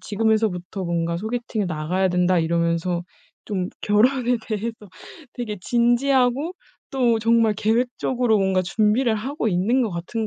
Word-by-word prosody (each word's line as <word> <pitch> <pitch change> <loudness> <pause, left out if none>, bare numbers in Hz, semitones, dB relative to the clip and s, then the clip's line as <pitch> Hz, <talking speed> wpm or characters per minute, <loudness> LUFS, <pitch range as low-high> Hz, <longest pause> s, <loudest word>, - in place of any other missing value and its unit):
'지금에서부터 210 -4 -1
뭔가 170 0 -1
소개팅에 220 +1 -3
나가야 180 +3 -1
된다.' 180 0 +2
이러면서 170 +1 0 0.4
좀 185 -4 -3
결혼에 245 +4 +2
대해서 225 +1 -3 0.6
되게 220 -4 -5
진지하고 250 - +2 0.4
또 245 -5 +2
정말 225 -1 +3
계획적으로 235 +1 +1
뭔가 190 -1 +1
준비를 220 +5 +1
하고 250 +1 -2
있는 210 +8 +1
것 225 - -1
같은 190 +6 -4
215 Hz, 315 characters per minute, -22 LUFS, 180-240 Hz, 0.6 s, 정말